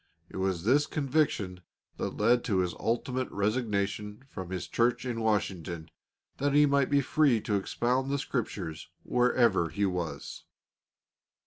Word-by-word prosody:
It - - -7
was 95 -3 -1
this 140 +7 +3
conviction 135 - 0 0.4
that - - -3
led 120 +3 +3
to 105 -7 +1
his 90 -1 -1
ultimate 125 +3 -1
resignation 105 0 -1
from 95 -9 -7
his 95 -1 -4
church 120 +2 +1
in 120 -2 -2
Washington, 95 -7 -1 0.5
that 145 0 +1
he 150 0 +7
might 140 -2 +2
be 145 -1 +4
free 140 -3 +3
to 105 - -2
expound 125 +6 0
the 140 - +1
Scriptures 80 - -4
wherever 120 -8 +3
he 100 0 0
was. 90 -4 -4
115 Hz, 140 wpm, -29 LUFS, 95-130 Hz, 0.5 s, he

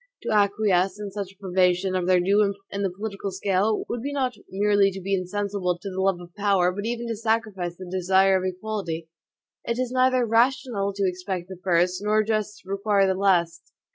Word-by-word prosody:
To - - -2
acquiesce 200 -2 +2
in 205 -1 -5
such 195 -1 -5
a 195 - -24
privation 185 0 +1
of 180 -1 -1
their 185 -1 +5
due 200 +4 +3
importance 200 -1 -1
in 200 - -3
the 195 - +1
political 200 +1 -5
scale, 195 +2 0
would 235 - -3
be 280 +4 -3
not 265 -3 -1 0.2
merely 205 0 +3
to 195 0 -7
be 195 +1 -3
insensible 190 -1 -1
to 190 +3 -7
the 190 0 -3
love 190 -2 +1
of 175 -1 -12
power, 195 -3 +2
but 205 +4 -4
even 235 0 -3
to 230 - -2
sacrifice 215 -6 -2
the 185 - -8
desire 190 +1 +3
of 185 - 0
equality. 185 -4 -4 0.5
It 235 - -2
is 255 -1 -1
neither 255 -1 +3
rational 230 -3 +1
to 195 -1 0
expect 180 0 -4
the 190 -2 -9
first, 180 0 +2
nor 215 +1 +3
just 215 -1 -2
to 190 - -17
require 200 0 +2
the 190 - +2
last. 175 -3 +1
195 Hz, 205 wpm, -25 LUFS, 185-210 Hz, 0.5 s, their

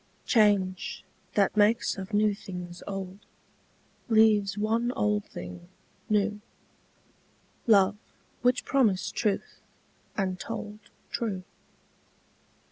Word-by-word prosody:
Change, 200 -5 +2 0.3
that 200 0 +3
makes 215 +2 +3
of 190 0 -7
new 210 0 +3
things 180 -4 -8
old, 195 -1 -5 0.9
Leaves 215 -2 +4
one 225 +3 +1
old 210 -2 0
thing 90 0 -9 0.4
new; 210 0 +1 1.3
Love 205 -2 +5 0.4
which 250 +1 +2
promised 225 -9 +2
truth, 210 -4 -1 0.6
and 190 -2 -1
told 210 +1 -6 0.3
True. 200 -6 -2
205 Hz, 90 wpm, -28 LUFS, 190-215 Hz, 1.3 s, Love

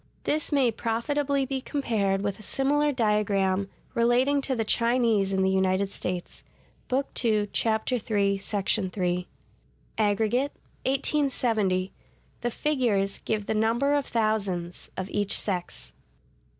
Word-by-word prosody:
This 305 +1 0
may 270 -5 +3
profitably 275 +5 0
be 265 0 -3
compared 205 -9 0
with 200 0 -2
a - - -10
similar 290 +6 +1
diagram 200 -5 +1 0.2
relating 250 +4 +3
to 270 -1 -1
the 225 -2 -1
Chinese 230 -4 +2
in 190 0 +1
the 190 - +2
United 190 +1 +1
States 180 -2 -5 0.4
(Book 270 +2 0
II, 215 -3 +2
Chap. 220 +1 0
III, 250 - +1 0.4
§ 200 0 -1
3). 180 -1 -1 0.7
Aggregate: 220 +6 +1 0.3
1870. 240 -9 +1 0.5
The 240 - 0
figures 235 -8 0
give 215 -2 -2
the - - -1
number 230 +6 +2
of 285 -1 +1
thousands 200 -6 -1
of 190 - -3
each 205 -1 0
sex. 175 - -4
220 Hz, 125 wpm, -27 LUFS, 195-260 Hz, 0.7 s, may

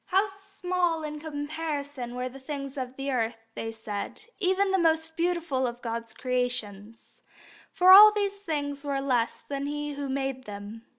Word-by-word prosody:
How 385 +3 +3
small 365 -4 -2
in 300 0 -5
comparison 290 -4 -4
were 250 0 -2
the 260 +2 -10
things 275 0 -6
of 255 -2 -5
earth, 245 -4 -1 0.2
they 225 0 -4
said, 220 - -6 0.2
even 385 0 +2
the 385 - +3
most 320 -1 +2
beautiful 335 -7 0
of 240 0 -7
God's 230 -1 -4
creations; 230 -4 -3 0.5
for 365 +1 +6
all 420 +3 +12
these 405 -1 -1
things 290 -6 -3
were 280 -1 -1
less 250 -4 0
than 280 0 -3
He 295 0 -3
who 280 -1 -4
made 270 -1 -2
them. 210 +2 -8
280 Hz, 160 wpm, -28 LUFS, 250-330 Hz, 0.5 s, all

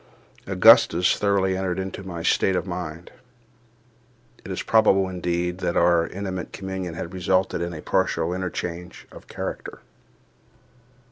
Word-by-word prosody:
Augustus 90 -2 +5
thoroughly 100 -2 +1
entered 95 -2 -2
into 95 +1 -5
my 85 -3 -7
state 95 - +2
of - - -1
mind. 85 -2 -6 1.3
It - - -10
is 95 - -3
probable, 95 -4 +4
indeed, 90 -1 -2
that 85 - -1
our 85 -1 +3
intimate 95 -1 -5
communion 95 -3 -5
had 85 +2 -6
resulted 95 0 0
in 85 0 -3
a 80 -3 -8
partial 85 +1 0
interchange 90 -1 -5
of - - -14
character. - - -6
90 Hz, 130 wpm, -24 LUFS, 85-95 Hz, 1.3 s, Augustus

